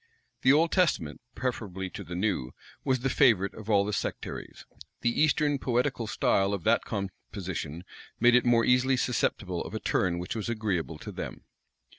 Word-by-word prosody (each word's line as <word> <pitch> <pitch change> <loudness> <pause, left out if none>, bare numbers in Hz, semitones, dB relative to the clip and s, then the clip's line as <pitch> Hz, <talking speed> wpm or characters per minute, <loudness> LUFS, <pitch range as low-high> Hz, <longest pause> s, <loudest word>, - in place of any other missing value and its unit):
The 130 - +6
Old 160 +3 +4
Testament, 105 - +1
preferably 100 -7 -3
to 100 - -7
the 90 0 -7
New, 90 -10 -1 0.3
was 130 -2 +1
the 135 - 0
favorite 110 -9 +4
of 110 0 -10
all 100 -2 +4
the 105 - -3
sectaries. - - -5 0.4
The 120 - +2
Eastern 150 -2 +3
poetical 125 -2 0
style 100 -2 +2
of 95 - -7
that - - +3
composition 95 -4 -5 0.4
made 120 +1 +5
it 125 - +5
more 120 -1 +4
easily 125 +1 +3
susceptible 125 -3 -1
of - - -7
a - - -2
turn 85 -1 0
which 90 +5 -4
was 110 +1 -3
agreeable 100 -8 -2
to - - -8
them. - - -7
110 Hz, 170 wpm, -28 LUFS, 95-125 Hz, 0.4 s, The